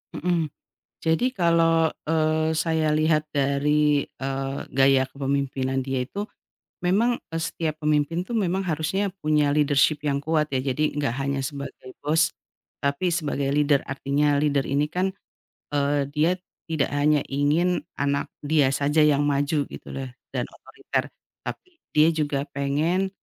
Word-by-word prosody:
Mhm. 170 Hz, -1 st, 0 dB, 0.5 s
Jadi 165 Hz, +11 st, +1 dB
kalau, 165 Hz, -5 st, +3 dB, 0.2 s
eee, 155 Hz, 0 st, +1 dB
saya 160 Hz, -1 st, +1 dB
lihat 155 Hz, 0 st, +2 dB
dari, 145 Hz, +1 st, +2 dB
eee, 135 Hz, 0 st, -4 dB
gaya 135 Hz, 0 st, +3 dB
kepemimpinan 135 Hz, -1 st, -1 dB
dia 130 Hz, -1 st, -1 dB
itu, 200 Hz, +11 st, -5 dB, 0.5 s
memang, 220 Hz, +7 st, +2 dB
e 165 Hz, -, -2 dB
setiap 160 Hz, -1 st, -2 dB
pemimpin 150 Hz, +3 st, +1 dB
tuh 240 Hz, -, -5 dB
memang 190 Hz, -3 st, +1 dB
harusnya 170 Hz, +5 st, 0 dB
punya 150 Hz, -1 st, +2 dB
leadership 150 Hz, 0 st, +3 dB
yang 140 Hz, -2 st, +1 dB
kuat, 155 Hz, +1 st, 0 dB
ya. 130 Hz, -, +1 dB
Jadi, 140 Hz, +3 st, -1 dB
nggak 140 Hz, -5 st, 0 dB
hanya 140 Hz, 0 st, -1 dB
sebagai 140 Hz, -2 st, -7 dB
bos, 155 Hz, +2 st, +2 dB, 0.5 s
tapi 140 Hz, +6 st, 0 dB
sebagai 145 Hz, -4 st, -1 dB
leader. 145 Hz, -1 st, +3 dB
Artinya 140 Hz, +2 st, +1 dB
leader 145 Hz, -2 st, +1 dB
ini 145 Hz, +2 st, +1 dB
kan, 190 Hz, +3 st, -1 dB, 0.6 s
eee, 145 Hz, 0 st, +1 dB
dia 160 Hz, +4 st, +2 dB, 0.3 s
tidak 155 Hz, -4 st, 0 dB
hanya 145 Hz, 0 st, +3 dB
ingin 150 Hz, +6 st, +1 dB, 0.2 s
anak 140 Hz, 0 st, 0 dB, 0.2 s
dia 145 Hz, -2 st, +3 dB
saja 145 Hz, +3 st, +1 dB
yang 145 Hz, -1 st, +4 dB
maju, 145 Hz, +1 st, +1 dB
gitu -, -, -11 dB
loh, 135 Hz, -1 st, -5 dB, 0.3 s
dan -, -, 0 dB
otoriter. -, -, -4 dB, 0.3 s
Tapi 365 Hz, -3 st, -8 dB, 0.2 s
dia 155 Hz, +2 st, +7 dB
juga 145 Hz, -3 st, -1 dB
pengen, 155 Hz, +7 st, 0 dB
150 Hz, 140 wpm, -25 LUFS, 140-160 Hz, 0.6 s, dia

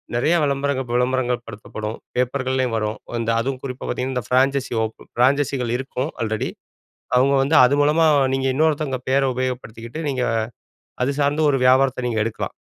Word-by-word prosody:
நெறைய 155 Hz, +8 st, +2 dB
விளம்பரங்கள் 140 Hz, -2 st, -1 dB
விளம்பரங்கள் 125 Hz, -1 st, 0 dB
படுத்தப்படும் 105 Hz, 0 st, -6 dB, 0.2 s
பேப்பர்கள்லயும் 130 Hz, -1 st, 0 dB
வரும். 105 Hz, 0 st, -2 dB, 0.2 s
அந்த 115 Hz, 0 st, -2 dB
அதுவும் 130 Hz, +2 st, -3 dB
குறிப்பா 130 Hz, -1 st, -6 dB
பாத்தீங்கன்னா, 130 Hz, +1 st, -2 dB
"இந்த 125 Hz, -, -1 dB
ஃபிரான்ச்சசி 135 Hz, 0 st, +2 dB
ஓப் 110 Hz, 0 st, -4 dB, 0.2 s
ஃபிரான்ச்சஸிகள் 130 Hz, -1 st, +1 dB
இருக்கும், 135 Hz, +2 st, -3 dB
ஆல்ரெடி 110 Hz, -1 st, -2 dB, 0.7 s
அவுங்க 135 Hz, +2 st, +4 dB
வந்து 140 Hz, +4 st, +1 dB
அது 125 Hz, +3 st, +3 dB
மூலமா 155 Hz, +3 st, +3 dB, 0.3 s
நீங்க 135 Hz, 0 st, 0 dB
இன்னொருத்தங்க 150 Hz, -2 st, +1 dB
பெயர 135 Hz, +1 st, +3 dB
உபயோகப்படுத்திக்கிட்டு," 125 Hz, +2 st, -4 dB
நீங்க 130 Hz, -2 st, -1 dB, 0.8 s
அது 140 Hz, -, 0 dB
சார்ந்த 145 Hz, +2 st, +1 dB
ஒரு 135 Hz, -, +1 dB
வியாபாரத்த 130 Hz, -1 st, +3 dB
நீங்க 115 Hz, -2 st, -1 dB
எடுக்கலாம். 115 Hz, -, -4 dB
130 Hz, 145 wpm, -21 LUFS, 125-140 Hz, 0.8 s, அவுங்க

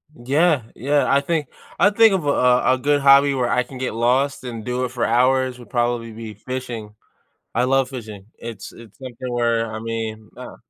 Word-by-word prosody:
Yeah, 140 Hz, +3 st, +1 dB
yeah, 145 Hz, +3 st, +1 dB
I 140 Hz, -, +4 dB
think 155 Hz, -1 st, -1 dB, 0.3 s
I 205 Hz, -, +4 dB
think 225 Hz, 0 st, +5 dB
of 175 Hz, -5 st, -3 dB
a, -, -, +1 dB
uh, 125 Hz, -2 st, +3 dB
a -, -, -5 dB
good 145 Hz, +2 st, +1 dB
hobby 140 Hz, +1 st, +6 dB
where 125 Hz, -2 st, 0 dB
I 125 Hz, -, +2 dB
can 130 Hz, +2 st, -11 dB
get 130 Hz, -2 st, -3 dB
lost 125 Hz, +5 st, +1 dB
and 115 Hz, -4 st, -7 dB
do 125 Hz, +1 st, -2 dB
it -, -, -4 dB
for 125 Hz, -1 st, -2 dB
hours 130 Hz, +1 st, +2 dB
would 120 Hz, -4 st, -14 dB
probably 120 Hz, -1 st, -1 dB
be 110 Hz, 0 st, -8 dB
fishing. 115 Hz, -2 st, -7 dB, 0.6 s
I 120 Hz, -, +2 dB
love 135 Hz, 0 st, +2 dB
fishing. 110 Hz, -6 st, -9 dB
It's 115 Hz, -4 st, -8 dB
it's 115 Hz, -3 st, -15 dB
something 130 Hz, -1 st, -7 dB
where, 115 Hz, -2 st, 0 dB
I -, -, -4 dB
mean, 110 Hz, -1 st, -5 dB
uh -, -, -10 dB
125 Hz, 200 wpm, -21 LUFS, 115-135 Hz, 0.6 s, hobby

